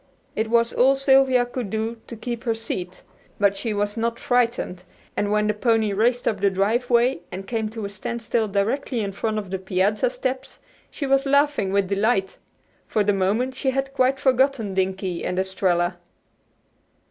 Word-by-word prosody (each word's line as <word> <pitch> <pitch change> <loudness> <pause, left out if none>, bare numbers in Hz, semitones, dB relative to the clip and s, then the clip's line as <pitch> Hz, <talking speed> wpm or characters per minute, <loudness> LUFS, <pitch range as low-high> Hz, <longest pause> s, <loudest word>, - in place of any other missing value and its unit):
It 220 +1 -1
was 235 0 +2
all 265 +2 +4
Sylvia 270 -2 +4
could 245 -3 -5
do 225 +2 -3
to 235 - -7
keep 235 +1 -5
her 230 -2 +1
seat, 185 -5 -6 0.4
but 200 -1 +3
she 220 +3 -3
was 205 0 -1
not 230 0 -1
frightened, 235 -7 0 0.3
and 205 - 0
when 210 0 +2
the 210 - +1
pony 220 -1 +1
raced 240 +4 +1
up 205 -3 0
the 200 - +4
driveway 235 +4 +2
and 190 +2 -6
came 220 0 -2
to 220 -1 -6
a - - -4
standstill 230 +2 -2
directly 225 +5 -1
in 200 -1 -2
front 215 +2 -2
of 200 -3 -5
the 190 - -2
piazza 190 - +1
steps 265 - -4 0.3
she 285 - -5
was 275 0 +2
laughing 280 -8 +2
with 200 -1 +2
delight. 200 -1 0 0.5
For 215 - +1
the 205 0 +2
moment 210 +7 0
she 265 +1 -1
had 270 +1 -2
quite 265 0 +2
forgotten 260 -5 +2
Dinkie 190 -1 -1
and 180 - -2
Estralla. 185 -2 0
225 Hz, 175 wpm, -23 LUFS, 200-250 Hz, 0.5 s, all